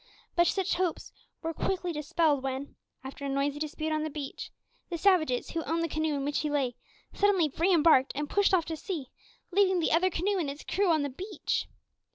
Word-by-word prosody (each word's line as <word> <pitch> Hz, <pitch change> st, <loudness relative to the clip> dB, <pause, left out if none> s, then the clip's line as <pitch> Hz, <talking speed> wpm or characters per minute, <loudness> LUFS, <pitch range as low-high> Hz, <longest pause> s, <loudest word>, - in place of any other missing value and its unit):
But 345 Hz, 0 st, +4 dB
such 385 Hz, +1 st, +1 dB
hopes 355 Hz, -2 st, -2 dB, 0.3 s
were 325 Hz, 0 st, -2 dB
quickly 360 Hz, +1 st, -1 dB
dispelled 300 Hz, -1 st, +1 dB
when, 270 Hz, +1 st, -4 dB, 0.3 s
after 270 Hz, +1 st, -8 dB
a 280 Hz, -, -2 dB
noisy 275 Hz, +1 st, 0 dB
dispute 310 Hz, +1 st, -3 dB
on 310 Hz, 0 st, 0 dB
the 310 Hz, -, -2 dB
beach, 285 Hz, -2 st, -6 dB, 0.4 s
the 345 Hz, -, -2 dB
savages, 315 Hz, -9 st, +2 dB
who 330 Hz, -1 st, -2 dB
owned 330 Hz, +1 st, 0 dB
the -, -, +1 dB
canoe 310 Hz, -1 st, -1 dB
in 275 Hz, -1 st, -2 dB
which 290 Hz, 0 st, 0 dB
he 300 Hz, -, -1 dB
lay, 270 Hz, -4 st, 0 dB, 0.4 s
suddenly 380 Hz, -8 st, +2 dB
re 350 Hz, +4 st, +2 dB
embarked 310 Hz, -6 st, +5 dB
and 295 Hz, +1 st, -2 dB
pushed 405 Hz, +5 st, +2 dB
off 355 Hz, -4 st, +3 dB
to 325 Hz, -, -3 dB
sea, 315 Hz, -, -5 dB, 0.4 s
leaving 380 Hz, -1 st, +3 dB
the 325 Hz, -, +1 dB
other 345 Hz, +4 st, +4 dB
canoe 380 Hz, +3 st, 0 dB
and 310 Hz, -5 st, -1 dB
its 285 Hz, +2 st, -7 dB
crew 395 Hz, 0 st, +1 dB
on 315 Hz, -3 st, +3 dB
the 285 Hz, -, -1 dB
beach. 380 Hz, +10 st, -3 dB
315 Hz, 210 wpm, -29 LUFS, 285-360 Hz, 0.4 s, embarked